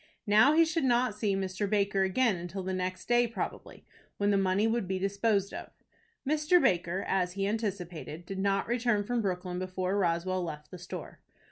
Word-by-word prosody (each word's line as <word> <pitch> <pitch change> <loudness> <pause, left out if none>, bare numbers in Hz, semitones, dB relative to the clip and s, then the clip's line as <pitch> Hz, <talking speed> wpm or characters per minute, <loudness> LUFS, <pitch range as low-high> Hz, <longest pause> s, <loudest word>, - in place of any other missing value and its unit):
Now 215 +8 +6
he 330 +1 +6
should 320 -1 -1
not 245 -2 +2
see 210 -2 0
Mr. 195 +1 -2
Baker 200 -2 +1
again 190 -2 +1
till 190 +2 -5
the 190 +1 -3
next 185 0 -3
day 240 0 +4
probably, 230 - -6 0.3
when 205 0 +2
the - - +3
money 195 +2 +2
would 225 -3 0
be 190 0 -1
disposed 200 +1 0
of. - - -7 0.6
Mr. 305 +4 +4
Baker, 175 - +1
as 180 -2 0
he 195 0 -1
anticipated, 180 -6 -4
did 195 +1 -5
not 195 0 +1
return 235 -3 +1
from 240 +3 -1
Brooklyn 180 -2 -3
before 185 +1 -2
Roswell 180 +1 0
left 150 -3 -7
the 180 - -9
store. 180 - -8
195 Hz, 180 wpm, -30 LUFS, 185-225 Hz, 0.6 s, Now